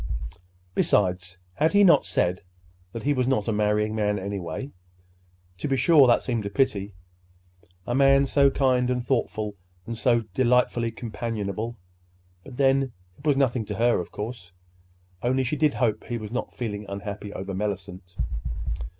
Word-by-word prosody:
Besides, 90 -3 +1 0.2
had 155 - +1
he 205 0 +6
not 170 -7 +5
said 90 +1 0 0.5
that 115 - -6
he 145 - +2
was 130 -2 0
not 130 -6 +1
a - - +1
marrying 105 0 +1
man, 105 -1 0
anyway? 100 +6 -5 0.9
To - - -2
be 135 -1 +1
sure, 150 -2 +6
that 120 - +4
seemed 120 -4 -1
a 100 - -3
pity—a 90 -3 -5
man 135 +1 +5
so 140 0 +4
kind 130 -2 +2
and 125 -1 -1
thoughtful 110 -5 -1 0.3
and 115 - -4
so 120 0 +2
delightfully 125 -2 +2
companionable! 115 -1 -4 0.7
But 125 - -11
then, 135 -2 +2 0.3
it 145 - -7
was 145 -2 +4
nothing 130 -4 +2
to 105 - -5
her, 120 +3 +3
of 90 - -6
course—only 90 +2 -5
she 130 +4 -1
did 150 -1 +2
hope 110 -4 0
he 120 - -3
was 110 -2 -7
not 120 - -4
feeling 105 -4 -4
unhappy 100 +1 -6
over 95 0 -5
Mellicent! 95 -2 -5
110 Hz, 150 wpm, -25 LUFS, 95-130 Hz, 0.9 s, he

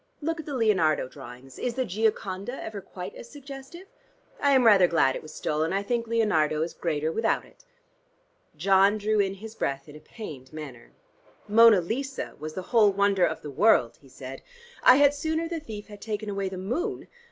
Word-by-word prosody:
Look 325 +2 -2
at 315 - -8
the 285 - -4
Leonardo 190 - +2
drawings. 130 -1 -12
Is 245 -2 -2
the 260 -1 0
'Gioconda' 215 +2 -2
ever 210 -2 -6
quite 185 0 -8
as 235 - -11
suggestive? 280 +5 -10 0.5
I 285 - +2
am 260 -2 +4
rather 200 -5 +7
glad 145 -6 +2
it - - -5
was 155 - -11
stolen. 155 +3 -1
I 200 +1 0
think 235 +2 -2
Leonardo 160 -10 +1
is 170 - -5
greater 155 -2 -2
without 225 +6 0
it." - - -22 0.9
John 195 +4 +4
drew 215 0 0
in 195 -1 +1
his 215 +3 -10
breath 140 -9 -3
in 150 - -12
a - - -10
pained 150 - -10
manner. 140 -7 -9 0.6
"'Mona 220 -2 +7
Lisa' 265 +9 -4
was 155 +1 -7
the 185 - -4
whole 215 -3 +6
wonder 200 -2 +3
of 160 - -5
the 150 - -6
world," 155 - +3
he 135 - -18
said. 130 +1 -9 0.4
"I 255 - +8
had 285 +1 +5
sooner 315 +3 -2
the 335 -1 -4
thief 215 -8 -8
had 205 -1 -12
taken 215 -1 -4
away 195 -1 -2
the 190 - -7
moon. 325 - -3
200 Hz, 195 wpm, -26 LUFS, 155-235 Hz, 0.9 s, I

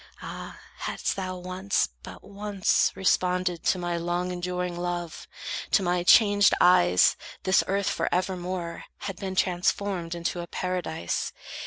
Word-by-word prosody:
Ah, - - -7 0.2
hadst - - -2
thou 185 -1 -4
once, 185 - -1
but - - -11
once, 200 -1 +1
Responded 180 -2 +1
to - - +3
my 175 -1 -2
long 175 +2 -1
enduring 180 0 -3
love, 175 -1 -4 0.5
To 200 - +5
my 175 0 +1
changed 205 +1 +6
eyes 90 - +5 0.3
this 190 +1 +4
earth 200 0 0
for 165 - -1
evermore 180 -2 -2 0.2
Had 195 -3 -5
been 190 -1 -4
transformed 180 -1 0
into 170 +1 -3
a 170 - -5
Paradise. 180 - -3
180 Hz, 135 wpm, -27 LUFS, 175-190 Hz, 0.5 s, changed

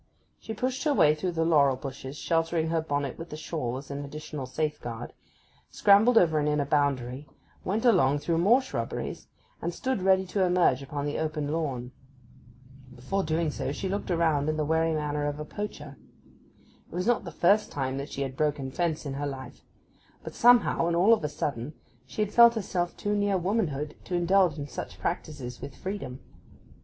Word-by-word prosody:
She 220 - -6
pushed 255 +4 -2
her 295 -2 +3
way 150 - +5
through 175 +4 -3
the 165 -1 0
laurel 145 -5 +4
bushes, 135 +1 -7
sheltering 165 0 0
her 165 0 +1
bonnet 145 -3 -3
with 165 +1 -7
the 150 - -7
shawl 150 -6 -3
as 140 +1 -9
an 140 +1 -4
additional 150 -1 -6
safeguard, 130 -4 -4 0.6
scrambled 215 +4 +5
over 160 -6 +4
an 150 - 0
inner 150 -1 +1
boundary, 140 -2 0 0.4
went 215 +6 -1
along 160 - +4
through 165 +3 0
more 235 +9 +5
shrubberies, 260 - -4 0.3
and - - -2
stood 260 -6 -1
ready 190 0 +3
to 190 +1 0
emerge 180 -7 +3
upon 145 +1 -4
the 145 - -2
open 155 -2 -2
lawn. 135 -6 -2 1.0
Before 165 +11 -2
doing 160 -2 0
so 140 - -3
she 190 +6 -3
looked 200 +1 -3
around 160 -4 +2
in 155 - -1
the 155 - 0
wary 160 +1 +1
manner 150 -1 -1
of 145 0 -3
a 150 - -4
poacher. 150 -7 -7 0.9
It - - -9
was 180 - -1
not 240 -1 +2
the 170 - -7
first 200 +6 +3
time 135 -1 -2
that 140 - -5
she 140 - -2
had 135 -1 -5
broken 145 -2 -1
fence 165 0 -1
in 140 - -3
her 145 +1 -3
life; 130 -2 -8 0.6
but - - -7
somehow, 240 -8 +4
and 170 - +1
all 190 +7 +6
of 220 - +1
a 150 - -1
sudden, 140 -1 -3 0.3
she 210 +11 -1
had 210 0 -5
felt 235 0 +8
herself 180 -5 -2
too 205 0 -1
near 205 -1 +1
womanhood 170 -7 -1
to 180 - -3
indulge 175 -2 +3
in 145 -1 -5
such 125 - -7
practices 145 -7 -4
with 135 - -8
freedom. 160 -10 -6
155 Hz, 190 wpm, -28 LUFS, 140-185 Hz, 1.0 s, felt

